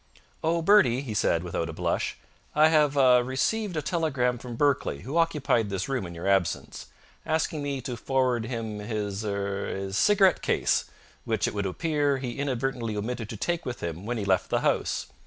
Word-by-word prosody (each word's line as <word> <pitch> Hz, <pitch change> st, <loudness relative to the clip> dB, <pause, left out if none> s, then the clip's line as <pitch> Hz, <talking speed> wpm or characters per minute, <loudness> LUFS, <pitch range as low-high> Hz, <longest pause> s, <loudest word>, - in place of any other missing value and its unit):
"Oh, 165 Hz, +1 st, +1 dB
Bertie," 185 Hz, -, +5 dB
he 125 Hz, -6 st, -5 dB
said, 85 Hz, -4 st, +1 dB
without 85 Hz, -2 st, -3 dB
a -, -, -5 dB
blush, -, -, -1 dB, 0.4 s
"I 155 Hz, +1 st, +6 dB
have 150 Hz, -3 st, +3 dB
ah 130 Hz, -2 st, +6 dB
received 160 Hz, -, -1 dB
a 155 Hz, -, -1 dB
telegram 135 Hz, -8 st, 0 dB
from 120 Hz, -1 st, -7 dB
Berkeley, 135 Hz, -, +1 dB
who 130 Hz, -, -6 dB
occupied 145 Hz, -9 st, +1 dB
this 95 Hz, -1 st, -2 dB
room 130 Hz, -9 st, -2 dB
in 85 Hz, -, -9 dB
your 85 Hz, +3 st, -5 dB
absence, 95 Hz, -4 st, 0 dB, 0.4 s
asking 155 Hz, -1 st, -1 dB
me 140 Hz, -2 st, -3 dB
to 125 Hz, 0 st, -4 dB
forward 125 Hz, -1 st, 0 dB
him 115 Hz, -4 st, -4 dB
his 105 Hz, -1 st, -3 dB
er 100 Hz, -1 st, -2 dB
his 95 Hz, 0 st, -4 dB
cigarette 195 Hz, -4 st, +4 dB
case, -, -, +1 dB, 0.4 s
which, -, -, 0 dB
it -, -, -3 dB
would 100 Hz, -2 st, -1 dB
appear, 145 Hz, -, 0 dB
he 130 Hz, 0 st, -5 dB
inadvertently 130 Hz, -5 st, -2 dB
omitted 110 Hz, +1 st, -4 dB
to 110 Hz, -, -6 dB
take 175 Hz, +8 st, -1 dB
with 125 Hz, -1 st, -6 dB
him 85 Hz, +4 st, -5 dB
when 120 Hz, 0 st, -1 dB
he 105 Hz, -, -3 dB
left 95 Hz, -2 st, +1 dB
the -, -, +1 dB
house. -, -, 0 dB
125 Hz, 190 wpm, -27 LUFS, 105-145 Hz, 0.4 s, I